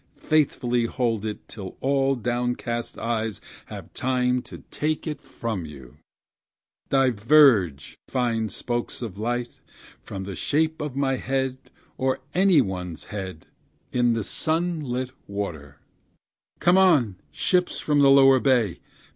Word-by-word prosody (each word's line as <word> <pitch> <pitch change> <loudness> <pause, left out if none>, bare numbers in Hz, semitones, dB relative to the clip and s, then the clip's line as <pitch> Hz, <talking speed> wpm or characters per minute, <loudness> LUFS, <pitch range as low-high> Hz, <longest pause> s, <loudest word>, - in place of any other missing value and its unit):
and - - -28
faithfully 125 -6 +2
hold 115 -3 -1
it, 105 - -7
till 100 -3 -8
all 135 0 +2
downcast 120 -1 -2
eyes 110 -2 -2 0.3
have - - -9
time 125 -1 +1
to - - -11
take 155 +1 -1
it 155 -2 -4
from 110 -6 -4
you; 70 -5 -11 0.9
Diverge, 120 - +4
fine 115 -4 0
spokes 120 +4 -3
of 105 -4 -6
light, 120 +2 -3 0.4
from 95 - -7
the 100 0 -6
shape 155 - 0
of 150 -3 -4
my 135 -1 +1
head, 130 0 -2 0.3
or 130 0 +1
any 185 -4 +5
one's 90 -6 -4
head, 95 -6 -6 0.5
in 120 -1 +2
the 115 -1 -1
sun 165 - -1
lit 130 -2 -3 0.2
water; 90 -8 -5 0.8
Come 175 +3 +4
on, 140 - +4
ships 180 -1 +1
from 150 -1 +1
the 140 -1 +6
lower 135 -1 +7
bay! 120 -10 +2
125 Hz, 130 wpm, -25 LUFS, 105-135 Hz, 0.9 s, lower